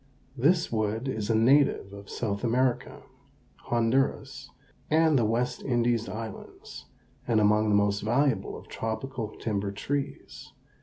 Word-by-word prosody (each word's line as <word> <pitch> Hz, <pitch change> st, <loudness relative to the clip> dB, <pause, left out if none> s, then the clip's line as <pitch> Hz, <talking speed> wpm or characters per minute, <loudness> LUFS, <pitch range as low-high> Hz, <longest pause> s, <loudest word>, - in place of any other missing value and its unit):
This 165 Hz, +7 st, +2 dB
wood 110 Hz, +2 st, -1 dB
is 110 Hz, -5 st, -3 dB
a 115 Hz, -, +3 dB
native 120 Hz, -3 st, +3 dB
of 100 Hz, 0 st, -11 dB
South 100 Hz, -2 st, -3 dB
America, 125 Hz, +1 st, 0 dB, 0.6 s
Honduras, 120 Hz, +3 st, 0 dB, 0.4 s
and 160 Hz, 0 st, +4 dB
the 115 Hz, -, +2 dB
West 120 Hz, +3 st, -1 dB
Indies 120 Hz, -3 st, 0 dB
Islands, 110 Hz, -1 st, -8 dB, 0.4 s
and 115 Hz, -2 st, +3 dB
among 105 Hz, +1 st, +3 dB
the 105 Hz, -, +3 dB
most 100 Hz, 0 st, +2 dB
valuable 130 Hz, +4 st, 0 dB
of -, -, -13 dB
tropical 110 Hz, 0 st, -5 dB
timber 100 Hz, -3 st, -2 dB
trees. 140 Hz, +7 st, -5 dB
115 Hz, 125 wpm, -27 LUFS, 105-130 Hz, 0.6 s, and